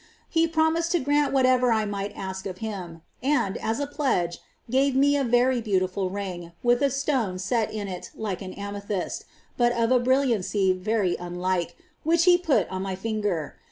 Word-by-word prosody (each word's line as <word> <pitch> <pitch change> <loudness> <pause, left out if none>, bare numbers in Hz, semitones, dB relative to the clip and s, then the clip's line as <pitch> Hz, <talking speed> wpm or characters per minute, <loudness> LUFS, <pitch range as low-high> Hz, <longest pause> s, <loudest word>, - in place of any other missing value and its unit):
He 330 0 +3
promised 330 +1 +1
to 350 - +3
grant 290 +1 +2
whatever 255 -2 +4
I 220 -1 +2
might 205 0 -3
ask 190 0 -5
of 185 -1 -6
Him, 180 -6 -6 0.2
and, 255 -8 +1
as 225 +4 -2
a 285 - 0
pledge, 260 - -1 0.3
gave 265 +3 +2
me 285 +2 +4
a 280 - +1
very 245 0 +3
beautiful 190 -3 0
ring, 180 -3 -5
with 240 +1 +3
a 280 - +4
stone 265 -8 0
set 220 +4 0
in 210 -2 -4
it 180 -2 -6
like 205 -5 -3
an 185 -1 -7
amethyst, 200 -1 -4 0.3
but 240 -1 +4
of 230 0 +1
a 255 - +5
brilliancy 235 -7 +2
very 185 -1 0
unlike, 175 0 -2 0.3
which 335 +2 +3
He 360 0 +7
put 350 -5 +2
on 185 0 -4
my 190 -1 -3
finger. 205 -6 -2
220 Hz, 180 wpm, -26 LUFS, 190-265 Hz, 0.3 s, He